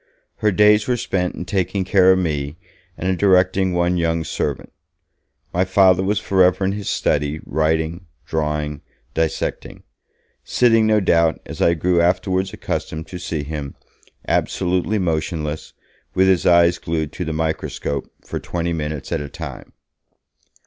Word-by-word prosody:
Her 105 - +2
days 105 +2 +4
were 125 -1 +1
spent 90 -5 -2
in 90 - -6
taking 95 +1 -1
care 95 -1 +5
of 95 - +4
me, 75 -4 -2 0.4
and 90 - -3
in 95 -1 +1
directing 95 -1 +3
one 90 0 +1
young 85 -1 0
servant. - - -3 0.8
My 90 - +2
Father 95 -1 +4
was 100 +2 0
forever 95 0 +3
in 95 - +1
his 100 0 -4
study, 75 +1 0
writing, 80 +3 -1 0.2
drawing, 75 -2 -2 0.3
dissecting; 80 -1 -2 0.6
sitting, 115 -3 +3
no 110 -1 +3
doubt, 85 -3 +2
as - - -7
I 85 - +4
grew 85 +2 +2
afterwards 95 +2 +1
accustomed 80 0 -4
to 90 - -7
see 80 -5 -3
him, 75 -2 -6 0.5
absolutely 90 +4 0
motionless, 80 -3 -2 0.4
with 95 +1 +4
his 95 -2 +3
eye 85 -1 +6
glued 80 -3 -3
to - - -5
the 80 - -3
microscope, 80 -3 -3 0.2
for - - -4
twenty 85 -1 -3
minutes 75 -2 -4
at - - -1
a 70 - -6
time. - - -8
90 Hz, 150 wpm, -20 LUFS, 80-95 Hz, 0.8 s, eye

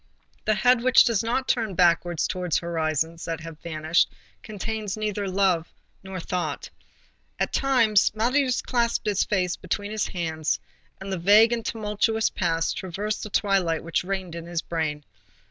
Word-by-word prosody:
The 215 - +2
head 245 +4 +4
which 255 +1 +6
does 230 -5 +1
not 240 +3 -1
turn 220 -6 0
backwards 175 -1 +2
towards 180 -3 -1
horizons 165 -1 -2
that 165 -1 -4
have 165 -1 -9
vanished 160 0 +1 0.3
contains 215 -1 -4
neither 210 -2 -2
thought 185 -3 +1 0.3
nor 190 -1 -7
love. 180 -1 -3 0.7
At - - -1
times, 235 -7 +3
Marius 255 +3 +1
clasped 235 -2 0
his 205 -2 +2
face 185 -3 0
between 205 0 -4
his 215 -1 -1
hands, 160 -3 -2 0.4
and 195 0 -5
the 185 - -2
vague 210 +6 +6
and 230 -1 -2
tumultuous 220 0 0
past 165 -2 -1
traversed 200 +4 -3
the 215 - -6
twilight 190 -6 +1
which 165 +2 -1
reigned 190 -2 -4
in 170 0 -7
his 170 -1 -3
brain. 155 -3 -3
195 Hz, 155 wpm, -25 LUFS, 170-215 Hz, 0.7 s, which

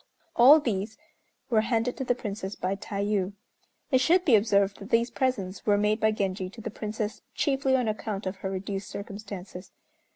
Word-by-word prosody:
All 275 +6 +8
these 215 -4 -2 0.5
were 220 -2 +4
handed 230 +2 0
to 265 - -2
the 245 -1 +1
Princess 205 -4 -5
by 185 +2 -2
Tayû. 200 -1 -2 0.6
It 260 - +5
should 355 +6 +4
be 255 - +6
observed 200 -2 +2
that 200 - -9
these 235 0 +2
presents 200 -8 -2
were 205 -1 +5
made 210 +2 +1
by 220 - +3
Genji 190 -3 -2
to 215 - -13
the - - -5
Princess 215 0 -4
chiefly 270 -2 +1
on 250 -3 +1
account 215 -1 -3
of 185 +1 -3
her 190 - -4
reduced 195 +1 -4
circumstances. 200 -3 -8
210 Hz, 175 wpm, -27 LUFS, 195-235 Hz, 0.6 s, All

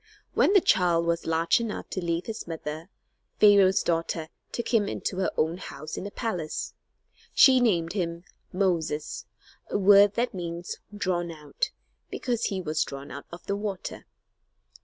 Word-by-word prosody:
When - - +4
the 395 - +7
child 175 - +3
was 170 0 -1
large 165 +4 +3
enough 225 -2 -4
to 185 - -3
leave 170 0 -1
his 225 -5 -6
mother 160 +1 -6 0.5
Pharaoh's 200 -2 +6
daughter 165 -1 -1 0.2
took 235 - -4
him 210 -3 +4
into 185 - -3
her 190 - +1
own 160 +2 +1
house 155 -3 -7
in - - -5
the - - -4
palace. 180 -8 -3 0.6
She 260 -2 +7
named 175 -8 +2
him 170 -3 -2 0.3
"Moses," 170 -5 -1 0.4
a - - 0
word 200 +1 +6
that 240 +1 0
means 175 -1 -5
"drawn 185 -4 -1
out," 150 -3 -3 0.4
because 240 -2 -2
he 195 -3 -1
was 155 -2 0
drawn 140 +1 -8
out 140 +2 -8
of 170 - -10
the 200 - -1
water. 200 -2 -5
175 Hz, 160 wpm, -27 LUFS, 165-205 Hz, 0.6 s, the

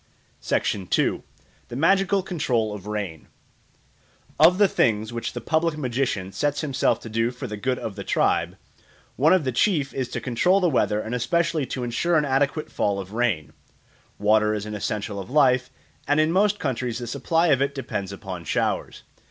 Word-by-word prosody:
2. - - +1 0.4
The - - -8
Magical 195 +6 +3
Control 125 - -1
of 105 -1 -8
Rain 100 -7 -4 1.1
OF 170 +4 +7
THE 205 0 +5
THINGS 110 - +1
which 115 - -4
the 120 - -5
public 160 +4 0
magician 125 -8 -2
sets 145 +6 -1
himself 140 -4 +1
to - - -9
do 115 +1 0
for 125 0 -7
the 105 - -5
good 125 +4 -1
of 105 - -5
the - - -6
tribe, - - +1 0.6
one 150 +5 +4
of 185 -3 +4
the 130 - -1
chief 145 - +1
is 130 -2 -3
to - - -3
control 175 +11 +2
the 180 - +2
weather 105 -5 +1
and 110 +2 -5
especially 165 +3 0
to 125 +1 -4
ensure 160 +8 +1
an 150 - +2
adequate 140 +3 0
fall 100 -1 0
of 95 +1 -8
rain. 110 - -1 0.6
Water 105 +1 +3
is 105 -1 -4
an 105 - -6
essential 105 0 -3
of 95 - -8
life, 130 -3 +3 0.4
and 145 +1 +3
in 155 +1 +3
most 205 +3 +3
countries 125 - -2
the 120 - -5
supply 165 +7 +1
of 135 -3 +3
it 140 +1 0
depends 100 -7 -4
upon 95 -3 -7
showers. 75 - -2
125 Hz, 180 wpm, -24 LUFS, 105-155 Hz, 1.1 s, OF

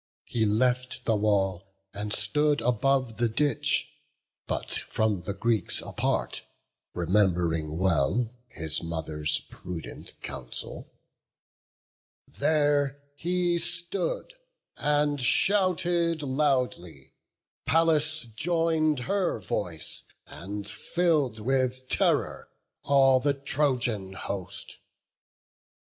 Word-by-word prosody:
He 110 -2 +1
left 125 +4 +1
the 115 - +3
wall, 95 -2 0 0.2
and 105 +1 -4
stood 150 +5 +1
above 125 0 +1
the 120 -1 +2
ditch, 145 +6 +1 0.6
But - - -3 0.2
from 110 -4 0
the 100 - -3
Greeks 110 -1 0
apart, - - -1 0.5
rememb'ring 85 -4 +1
well 95 - +2 0.2
His 80 -5 -3
mother's 80 -2 -2
prudent 90 -3 -8
counsel; - - -6 1.4
there 145 -2 +2 0.2
he 175 +2 +1
stood, 180 - -3 0.4
And 145 -1 +1
shouted 175 0 +2
loudly; 130 - -1 0.5
Pallas 160 -1 +3
join'd 160 -2 +2
her 190 +2 0
voice, 90 -5 -3 0.2
And 100 +4 -6
fill'd 145 0 +1
with 130 +2 0
terror - - +1 0.4
all 135 -2 +5
the 140 +2 +1
Trojan 125 -8 0
host. 95 0 -5
125 Hz, 90 wpm, -28 LUFS, 95-150 Hz, 1.4 s, all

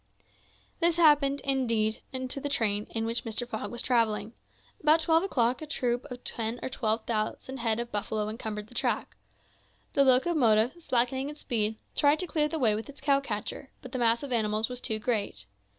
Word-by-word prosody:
This 340 -1 +3
happened, 290 -4 +4
indeed, 230 -5 +1
to 260 +1 -3
the 285 - -2
train 210 -6 +1
in 225 -1 -2
which 230 +1 -1
Mr. 230 +1 -3
Fogg 245 - -4
was 240 0 -3
travelling. 225 -3 +1 0.5
About 310 +2 +5
twelve 325 0 +3
o'clock 255 -10 +1
a 310 - -6
troop 245 -4 -1
of 250 -1 -8
ten 230 +1 -2
or - - -2
twelve 225 -3 -1
thousand 230 +4 -2
head 230 -2 +1
of 235 0 -4
buffalo 210 +1 -2
encumbered 215 -1 -5
the 220 - -18
track. - - -1 0.8
The 280 - +5
locomotive, 255 -4 +4
slackening 260 0 +1
its 300 0 -9
speed, 220 -4 0 0.2
tried 290 +1 +4
to 365 - -2
clear 300 -2 +1
the 320 - -3
way 235 -7 +4
with 220 +6 -4
its 285 -1 -11
cow 275 0 +3
catcher; 245 +1 -5
but 255 - -9
the 260 - -3
mass 235 +2 +3
of 280 - -6
animals 215 -1 +1
was 250 0 -5
too 220 - -1
great. 210 - -2
245 Hz, 190 wpm, -28 LUFS, 220-275 Hz, 0.8 s, About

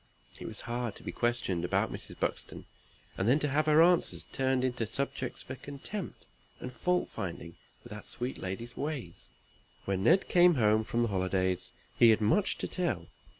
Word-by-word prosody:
It - - -6
was - - -7
hard 120 -2 -3
to - - -13
be - - -4
questioned 120 -8 -1
about 90 - 0
Mrs. - - -8
Buxton, - - -3 0.5
and 95 - +1
then 130 +5 +5
to 150 - 0
have 150 +3 +1
her 155 +1 +7
answers 175 0 +3
turned 130 -1 0
into 120 -3 -1
subjects 135 +1 -3
for 130 - -7
contempt, 145 +9 -7 0.3
and 125 - -7
fault 180 +5 0
finding 85 -2 -6 0.3
with - - -13
that 105 - -9
sweet 125 +2 -3
lady's 105 +6 -5
ways. 140 - -5 0.6
When 95 -1 -1
Ned 190 - +4
came 175 -1 +6
home 110 -3 +3
for 115 +1 -5
the 120 -1 +2
holidays, 95 -1 0 0.3
he 120 - +8
had 110 - +5
much 110 - +2
to - - -3
tell. 115 - -2
120 Hz, 180 wpm, -31 LUFS, 100-145 Hz, 0.6 s, he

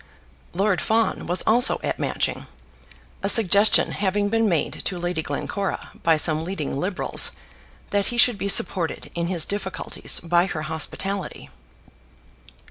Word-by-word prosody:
Lord 195 +1 0
Fawn 225 0 0
was 175 +1 +1
also 240 +3 +4
at - - -3
Matching, - - -3 0.7
a 195 - 0
suggestion 205 -1 +4
having 205 +1 -1
been 225 0 +1
made 165 -4 -2
to 185 - -3
Lady 175 -2 -3
Glencora 190 +7 -4
by 165 -1 +3
some 155 0 0
leading 170 -6 -4
Liberals 180 +7 +2 0.6
that 200 -1 0
he 240 - -3
should 235 -3 +4
be 200 - -2
supported 180 -3 +1
in 170 0 -3
his 175 -3 +5
difficulties 190 -2 -2
by 175 +2 +1
her 155 -5 -5
hospitality. 165 +4 -4
190 Hz, 135 wpm, -22 LUFS, 170-205 Hz, 0.7 s, his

